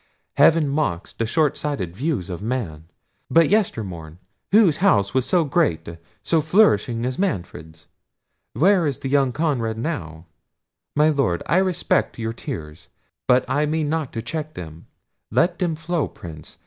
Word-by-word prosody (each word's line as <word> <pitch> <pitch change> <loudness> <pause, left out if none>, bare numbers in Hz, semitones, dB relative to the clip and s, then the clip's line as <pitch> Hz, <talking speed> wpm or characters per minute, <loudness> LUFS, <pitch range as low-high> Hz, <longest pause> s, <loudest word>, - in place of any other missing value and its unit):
Heaven 155 +1 +4
mocks 140 - -2
the 115 - -2
short 155 +3 +1
sighted 135 - -4
views 125 - -2
of 90 - -6
man. 105 -10 -4 0.4
But 165 -1 +4
yester 205 - +1
morn, 80 -4 -9 0.3
whose 195 -7 +5
house 100 - +2
was 130 -1 +1
so 180 -2 +3
great, 140 - 0 0.4
so 165 -2 +2
flourishing 135 - +3
as 125 0 -3
Manfred's?—where 140 - -2
is 140 -1 -4
young 135 -1 +2
Conrad 125 -7 -1
now?—My 95 - -4
Lord, 135 - 0
I 170 - +2
respect 185 -2 0
your 115 -1 -3
tears—but 80 +7 -3
I 150 +1 +1
mean 155 -1 -1
not 155 -3 -2
to 115 - -4
check 155 +3 -5
them—let 95 - -4
them 175 -4 0
flow, 165 0 -2
Prince! 80 -3 -11
135 Hz, 135 wpm, -22 LUFS, -, 0.4 s, whose